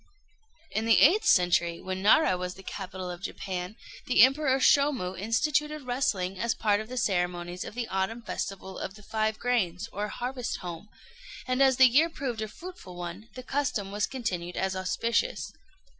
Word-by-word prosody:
In 220 Hz, -, -1 dB
the 225 Hz, -, +6 dB
eighth 370 Hz, +10 st, +5 dB
century, 175 Hz, -2 st, +3 dB
when 185 Hz, 0 st, -4 dB
Nara 200 Hz, -1 st, +5 dB
was 180 Hz, 0 st, -4 dB
the 195 Hz, -, -13 dB
capital 185 Hz, -2 st, -6 dB
of 175 Hz, +1 st, -8 dB
Japan, 185 Hz, 0 st, -5 dB, 0.3 s
the 245 Hz, -, +6 dB
Emperor 270 Hz, 0 st, +4 dB
Shômu 270 Hz, -9 st, +3 dB
instituted 295 Hz, -, 0 dB
wrestling 210 Hz, -8 st, -1 dB
as 235 Hz, +1 st, 0 dB
part 205 Hz, -1 st, +1 dB
of 220 Hz, -, -10 dB
the 255 Hz, -, -6 dB
ceremonies 180 Hz, -3 st, -1 dB
of -, -, -9 dB
the 245 Hz, -2 st, -3 dB
autumn 195 Hz, +5 st, -2 dB
festival 190 Hz, -3 st, -5 dB
of 190 Hz, -, -5 dB
the 210 Hz, -, -15 dB
Five 220 Hz, +1 st, -1 dB
Grains, 215 Hz, -5 st, 0 dB
or 205 Hz, +2 st, -2 dB
Harvest 250 Hz, +2 st, -4 dB
Home; 175 Hz, +3 st, -7 dB, 0.6 s
and 255 Hz, +1 st, +1 dB
as 265 Hz, -2 st, +5 dB
the 260 Hz, -, +8 dB
year 285 Hz, +7 st, +5 dB
proved 255 Hz, -8 st, -4 dB
a 215 Hz, -, -2 dB
fruitful 340 Hz, -, -10 dB
one, 175 Hz, +5 st, -7 dB
the 255 Hz, -, -7 dB
custom 255 Hz, -8 st, -2 dB
was 210 Hz, +1 st, 0 dB
continued 180 Hz, -9 st, -4 dB
as 190 Hz, 0 st, -1 dB
auspicious. 230 Hz, -, -1 dB
215 Hz, 175 wpm, -28 LUFS, 185-255 Hz, 0.6 s, the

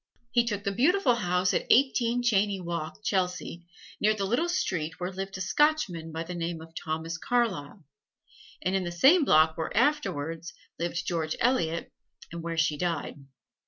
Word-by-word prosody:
He 240 Hz, -, +4 dB
took 205 Hz, -2 st, -2 dB
the 200 Hz, -, 0 dB
beautiful 280 Hz, -, +3 dB
house 180 Hz, -5 st, +1 dB
at -, -, -1 dB
Eighteen 245 Hz, -2 st, +3 dB
Cheyne 200 Hz, -5 st, +1 dB
Walk, 170 Hz, +3 st, -5 dB
Chelsea, 180 Hz, -3 st, -2 dB, 0.3 s
near 215 Hz, +1 st, +3 dB
the 200 Hz, -2 st, -2 dB
little 245 Hz, -, 0 dB
street 165 Hz, -, -2 dB
where 180 Hz, +1 st, -3 dB
lived 195 Hz, 0 st, -5 dB
a -, -, -6 dB
Scotchman 190 Hz, -, +1 dB
by 160 Hz, +1 st, -4 dB
the 175 Hz, +2 st, -7 dB
name 170 Hz, -1 st, -3 dB
of 165 Hz, 0 st, -13 dB
Thomas 160 Hz, 0 st, -4 dB
Carlyle, 220 Hz, -13 st, -1 dB, 0.8 s
and 185 Hz, +1 st, 0 dB
in 190 Hz, -, +1 dB
the 175 Hz, -, -4 dB
same 275 Hz, -, +5 dB
block 160 Hz, -, +4 dB
where 160 Hz, -, -3 dB
afterwards 170 Hz, -, 0 dB, 0.3 s
lived 170 Hz, 0 st, -2 dB
George 160 Hz, -3 st, -1 dB
Eliot, 170 Hz, -10 st, 0 dB, 0.4 s
and 170 Hz, 0 st, -6 dB
where 165 Hz, 0 st, -4 dB
she 155 Hz, -2 st, +2 dB
died. 165 Hz, -4 st, -2 dB
180 Hz, 165 wpm, -28 LUFS, 165-235 Hz, 0.8 s, same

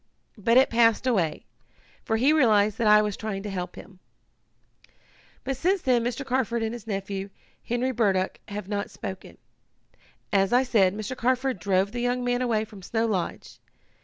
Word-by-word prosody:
But 230 Hz, +4 st, +3 dB
it 265 Hz, -, +5 dB
passed 230 Hz, +1 st, +3 dB
away, 190 Hz, -11 st, 0 dB, 0.6 s
for 225 Hz, -, 0 dB
he 270 Hz, +7 st, +4 dB
realized 215 Hz, -7 st, +3 dB
that 230 Hz, -, +2 dB
I 210 Hz, 0 st, +6 dB
was 210 Hz, -2 st, -2 dB
trying 205 Hz, -3 st, -5 dB
to 205 Hz, -, -5 dB
help 180 Hz, -2 st, -5 dB
him. 190 Hz, -2 st, -13 dB, 1.4 s
"But 270 Hz, +1 st, -2 dB
since 370 Hz, +6 st, +1 dB
then 245 Hz, -3 st, +2 dB
Mr. 245 Hz, +3 st, -3 dB
Carford 245 Hz, -3 st, 0 dB
and 220 Hz, +1 st, -2 dB
his 235 Hz, -2 st, -9 dB
nephew, 195 Hz, -1 st, -4 dB, 0.3 s
Henry 245 Hz, +2 st, -1 dB
Burdock, 195 Hz, -6 st, 0 dB
have 205 Hz, -2 st, -6 dB
not 205 Hz, -1 st, -3 dB
spoken. 190 Hz, 0 st, -8 dB, 1.0 s
As 195 Hz, +2 st, +2 dB
I 250 Hz, +2 st, +5 dB
said, 205 Hz, -7 st, +2 dB
Mr. 215 Hz, +4 st, -5 dB
Carford 255 Hz, -2 st, 0 dB
drove 190 Hz, +2 st, +1 dB
the 240 Hz, +1 st, -4 dB
young 245 Hz, +1 st, 0 dB
man 245 Hz, 0 st, 0 dB
away 225 Hz, -3 st, 0 dB
from 210 Hz, -3 st, -13 dB
Snow 225 Hz, +5 st, -1 dB
Lodge. 190 Hz, -6 st, -3 dB
220 Hz, 170 wpm, -26 LUFS, 200-245 Hz, 1.4 s, I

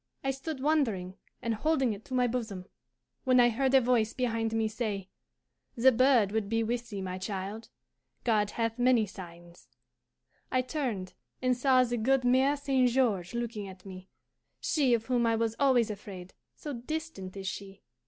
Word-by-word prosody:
I 270 Hz, -, +1 dB
stood 270 Hz, +1 st, -5 dB
wondering 230 Hz, -13 st, +1 dB, 0.3 s
and 230 Hz, -, 0 dB
holding 265 Hz, -1 st, +1 dB
it 205 Hz, +1 st, -10 dB
to 260 Hz, -, -5 dB
my 250 Hz, -1 st, +3 dB
bosom, 225 Hz, -6 st, -3 dB, 0.6 s
when 255 Hz, -1 st, +4 dB
I 240 Hz, 0 st, +6 dB
heard 260 Hz, +3 st, +1 dB
a -, -, +9 dB
voice 235 Hz, -3 st, +2 dB
behind 230 Hz, -3 st, -1 dB
me 225 Hz, 0 st, +1 dB
say, 210 Hz, -4 st, -3 dB, 0.7 s
'The 255 Hz, +3 st, +6 dB
bird 245 Hz, -4 st, +4 dB
would 215 Hz, -2 st, -1 dB
be 225 Hz, +1 st, +1 dB
with 240 Hz, +1 st, -2 dB
thee, 200 Hz, -3 st, -5 dB
my 185 Hz, 0 st, -4 dB
child. 200 Hz, +3 st, -5 dB, 0.5 s
God 215 Hz, -3 st, +2 dB
hath 230 Hz, +1 st, -2 dB
many 245 Hz, -3 st, +4 dB
signs.' 175 Hz, -3 st, -12 dB, 0.8 s
I 255 Hz, 0 st, +2 dB
turned 245 Hz, -9 st, -3 dB, 0.3 s
and 255 Hz, -1 st, +2 dB
saw 255 Hz, 0 st, +4 dB
the 240 Hz, -1 st, -1 dB
good 260 Hz, +3 st, +2 dB
Mere 265 Hz, +3 st, +4 dB
St. 270 Hz, -3 st, +2 dB
George 225 Hz, -7 st, +1 dB
looking 230 Hz, -4 st, -3 dB
at 185 Hz, 0 st, -12 dB
me, 185 Hz, -1 st, -10 dB, 0.5 s
she 270 Hz, -6 st, +2 dB
of 225 Hz, -1 st, -4 dB
whom 245 Hz, -2 st, +1 dB
I 230 Hz, -, +3 dB
was 225 Hz, 0 st, 0 dB
always 255 Hz, -6 st, +3 dB
afraid, 190 Hz, -3 st, -9 dB, 0.2 s
so 295 Hz, -, -6 dB
distant 250 Hz, -, -5 dB
is 195 Hz, -, -6 dB
she. 195 Hz, 0 st, -7 dB
230 Hz, 175 wpm, -30 LUFS, 205-255 Hz, 0.8 s, a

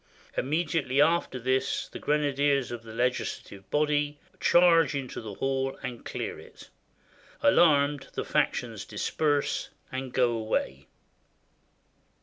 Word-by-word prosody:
Im 130 Hz, -, -2 dB
mediately 150 Hz, -4 st, 0 dB
after 160 Hz, -2 st, +3 dB
this 130 Hz, +2 st, 0 dB
the -, -, -8 dB
grenadiers 145 Hz, -3 st, +1 dB
of 120 Hz, -1 st, -5 dB
the 115 Hz, -1 st, -11 dB
legislative 115 Hz, -4 st, -3 dB
body 150 Hz, 0 st, +1 dB, 0.2 s
charge 165 Hz, -4 st, +5 dB
into 135 Hz, -3 st, -4 dB
the 105 Hz, -3 st, -7 dB
hall 135 Hz, +2 st, -1 dB
and 125 Hz, -2 st, -6 dB
clear -, -, -5 dB
it. -, -, -14 dB, 0.7 s
Alarmed, 145 Hz, -6 st, +4 dB
the -, -, -3 dB
factions -, -, -1 dB
dis -, -, -4 dB
perse 145 Hz, -2 st, 0 dB, 0.2 s
and 130 Hz, 0 st, -4 dB
go 125 Hz, -2 st, +2 dB
away. 110 Hz, -, -2 dB
135 Hz, 125 wpm, -28 LUFS, 125-150 Hz, 0.7 s, charge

